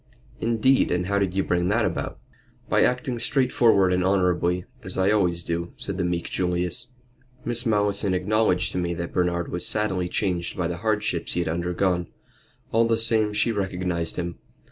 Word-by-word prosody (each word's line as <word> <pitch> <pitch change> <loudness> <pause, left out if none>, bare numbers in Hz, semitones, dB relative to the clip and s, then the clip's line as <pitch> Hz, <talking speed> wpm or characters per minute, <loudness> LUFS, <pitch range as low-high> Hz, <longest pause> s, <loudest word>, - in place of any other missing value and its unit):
"Indeed! 120 +3 +2
And 90 0 0
how 100 +2 +1
did 95 -2 -1
you 95 - +2
bring 90 0 0
that 105 +4 +2
about?" - - -3 0.5
"By - - +2
acting 125 -1 +1
straightforward 120 -7 +3
and 90 0 +1
honorably, 90 -2 +1 0.2
as 95 -5 -5
I 95 +2 +3
always 90 -5 +2
do," 85 +1 -3
said 100 -1 -4
the - - +1
meek 85 -1 -1
Julius. 90 +2 0 0.6
"Miss 120 0 +1
Malleson 100 -2 +2
acknowledged 95 -1 +1
to - - -2
me 85 -1 -1
that 85 0 -5
Bernard 85 -1 0
was 90 0 -3
sadly 95 -5 -1
changed 90 -4 -1
by 90 -2 0
the 85 0 -4
hardships 105 -4 -1
he - - -1
had 85 - -2
undergone. 90 +1 0 0.6
All 115 +1 +3
the 115 -1 +2
same 110 -2 +2
she 105 +3 +2
recognized 90 -5 -2
him. 85 -1 -4
95 Hz, 175 wpm, -24 LUFS, 90-105 Hz, 0.6 s, straightforward